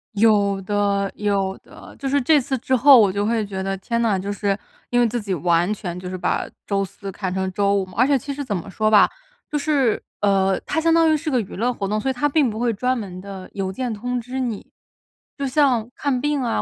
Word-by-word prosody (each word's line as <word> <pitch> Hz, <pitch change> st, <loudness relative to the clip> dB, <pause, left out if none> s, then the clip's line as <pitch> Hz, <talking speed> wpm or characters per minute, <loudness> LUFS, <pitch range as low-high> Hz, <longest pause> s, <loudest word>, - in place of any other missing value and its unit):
有 200 Hz, -2 st, +3 dB
的 200 Hz, 0 st, 0 dB
有 195 Hz, -2 st, -1 dB
的。 -, -, -14 dB
就 275 Hz, -, -4 dB
是 280 Hz, +1 st, +2 dB
这 300 Hz, +4 st, +4 dB
次 265 Hz, 0 st, -2 dB
之 260 Hz, +1 st, +1 dB
后 265 Hz, 0 st, +8 dB
我 205 Hz, -3 st, +4 dB
就 200 Hz, +2 st, -1 dB
会 225 Hz, -1 st, 0 dB
觉 195 Hz, -1 st, -5 dB
得 195 Hz, 0 st, -2 dB
天 235 Hz, +5 st, -2 dB
呐， 220 Hz, -4 st, +2 dB
就 195 Hz, +2 st, -3 dB
是 200 Hz, -1 st, -1 dB, 0.3 s
因 245 Hz, -, +2 dB
为 240 Hz, -, +4 dB
自 240 Hz, +2 st, -2 dB
己 200 Hz, -2 st, -3 dB
完 175 Hz, +2 st, +1 dB
全 180 Hz, -4 st, -6 dB
就 180 Hz, -, -7 dB
是 185 Hz, -, -4 dB
把 -, -, -1 dB, 0.2 s
周 195 Hz, -1 st, 0 dB
四 195 Hz, +1 st, -9 dB
看 190 Hz, -1 st, -4 dB
成 190 Hz, 0 st, -2 dB
周 200 Hz, +1 st, +1 dB
五 195 Hz, -1 st, 0 dB
嘛。 185 Hz, -, -15 dB
而 245 Hz, -, +5 dB
且 280 Hz, -1 st, +4 dB
其 280 Hz, +2 st, -5 dB
实 285 Hz, +1 st, -4 dB
怎 210 Hz, -, -2 dB
么 180 Hz, +1 st, -5 dB
说 215 Hz, +3 st, 0 dB
吧， 210 Hz, -, +6 dB, 0.4 s
就 300 Hz, -, 0 dB
是 280 Hz, -6 st, +1 dB, 0.2 s
呃， 195 Hz, -2 st, +2 dB
它 320 Hz, -, -1 dB
相 330 Hz, 0 st, +3 dB
当 330 Hz, -1 st, +5 dB
于 310 Hz, -, +3 dB
是 310 Hz, +1 st, -4 dB
个 255 Hz, -, +2 dB
娱 200 Hz, -, -9 dB
乐 245 Hz, +4 st, 0 dB
活 200 Hz, -4 st, -3 dB
动， 215 Hz, +1 st, 0 dB
所 265 Hz, -, -1 dB
以 -, -, 0 dB
它 290 Hz, +4 st, 0 dB
并 285 Hz, -4 st, +3 dB
不 220 Hz, -, -5 dB
会 240 Hz, 0 st, +1 dB
专 250 Hz, +5 st, 0 dB
门 190 Hz, -5 st, -6 dB
地 195 Hz, -1 st, -9 dB
邮 195 Hz, -1 st, -3 dB
件 240 Hz, +3 st, -3 dB
通 245 Hz, +4 st, -3 dB
知 250 Hz, +3 st, -5 dB
你。 235 Hz, -5 st, -4 dB, 0.6 s
就 280 Hz, -1 st, -3 dB
像 255 Hz, -5 st, +2 dB
看 270 Hz, -4 st, -1 dB
病 295 Hz, 0 st, 0 dB
啊 230 Hz, -, 0 dB
215 Hz, 270 characters per minute, -22 LUFS, 195-255 Hz, 0.6 s, 后